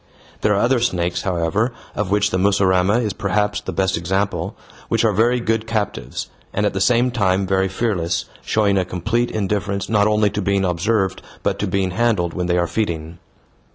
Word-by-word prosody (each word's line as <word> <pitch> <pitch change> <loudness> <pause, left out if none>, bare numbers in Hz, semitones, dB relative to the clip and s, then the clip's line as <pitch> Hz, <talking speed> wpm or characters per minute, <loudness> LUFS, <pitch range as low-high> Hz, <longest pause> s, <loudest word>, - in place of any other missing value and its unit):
There 105 - +3
are - - +1
other 125 +3 +3
snakes, 90 -6 0
however, 95 +6 0 0.2
of 105 -3 -2
which 105 +1 +2
the 95 - 0
mussurama 95 +1 +3
is 105 -4 -1
perhaps 105 +1 0
the - - -5
best 95 0 +1
example, 95 +1 -1 0.3
which - - +2
are 110 - +3
very 120 +5 +3
good 115 -1 -1
captives, 110 -3 -3 0.3
and - - +1
at - - +1
the - - -2
same 125 +1 +3
time 95 -5 +1
very 95 0 +1
fearless, 95 -4 -1 0.2
showing 100 -3 +2
a - - +1
complete 110 +7 -1
indifference 100 -1 -2
not 105 -2 +3
only 105 -1 +2
to 105 - -2
being 100 0 +1
observed 95 +3 0 0.2
but - - 0
to - - -1
being 95 -1 0
handled 100 -5 +1
when 90 -1 -2
they 90 0 +2
are 85 - +2
feeding. 85 -5 -3
100 Hz, 190 wpm, -20 LUFS, 90-110 Hz, 0.3 s, There